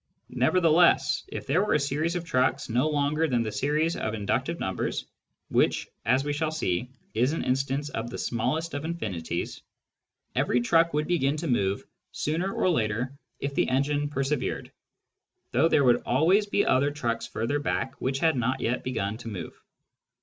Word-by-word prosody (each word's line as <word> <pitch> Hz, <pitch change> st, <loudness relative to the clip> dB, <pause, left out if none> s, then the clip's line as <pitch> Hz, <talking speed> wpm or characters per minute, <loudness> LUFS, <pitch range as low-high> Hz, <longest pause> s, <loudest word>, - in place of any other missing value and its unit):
Nevertheless, 165 Hz, -5 st, +4 dB
if -, -, -6 dB
there 160 Hz, +8 st, +2 dB
were 210 Hz, -, +1 dB
a -, -, +4 dB
series 150 Hz, +5 st, -1 dB
of 175 Hz, -1 st, -3 dB
trucks 130 Hz, -6 st, +1 dB
no 125 Hz, +7 st, +2 dB
longer 150 Hz, +2 st, +1 dB
than 120 Hz, -5 st, +1 dB
the 110 Hz, -, -3 dB
series 150 Hz, +9 st, +1 dB
of 110 Hz, -, -2 dB
inductive 100 Hz, -2 st, -1 dB
numbers -, -, -2 dB, 0.4 s
(which, -, -, +2 dB, 0.2 s
as 130 Hz, +3 st, +3 dB
we 145 Hz, 0 st, -1 dB
shall 155 Hz, +1 st, 0 dB
see, 125 Hz, -, -1 dB, 0.2 s
is 125 Hz, +6 st, +2 dB
an 165 Hz, -, -2 dB
instance 135 Hz, +3 st, 0 dB
of 115 Hz, -3 st, -4 dB
the -, -, -6 dB
smallest 160 Hz, +8 st, -1 dB
of 145 Hz, +1 st, -3 dB
infinites), 95 Hz, -, -4 dB, 0.7 s
every 125 Hz, -, +2 dB
truck 165 Hz, +6 st, +3 dB
would 150 Hz, 0 st, +1 dB
begin 150 Hz, -4 st, +1 dB
to 165 Hz, +2 st, -3 dB
move 100 Hz, -6 st, +1 dB, 0.3 s
sooner 170 Hz, +6 st, -1 dB
or -, -, 0 dB
later 115 Hz, -1 st, 0 dB, 0.3 s
if 140 Hz, 0 st, -2 dB
the -, -, +1 dB
engine 145 Hz, +2 st, +1 dB
persevered, 140 Hz, -1 st, -2 dB, 0.8 s
though 165 Hz, -, +4 dB
there 150 Hz, -3 st, +3 dB
would 125 Hz, -2 st, +4 dB
always 175 Hz, -, +3 dB
be 205 Hz, 0 st, +2 dB
other 140 Hz, +3 st, +3 dB
trucks 120 Hz, -6 st, -2 dB
further 130 Hz, +7 st, -1 dB
back 130 Hz, -2 st, -1 dB
which 130 Hz, +1 st, 0 dB
had 160 Hz, +2 st, +2 dB
not 130 Hz, +2 st, 0 dB
yet 125 Hz, +1 st, -1 dB
begun 110 Hz, -4 st, -2 dB
to 115 Hz, -, -10 dB
move. 95 Hz, -7 st, -6 dB
140 Hz, 170 wpm, -27 LUFS, 120-155 Hz, 0.8 s, Nevertheless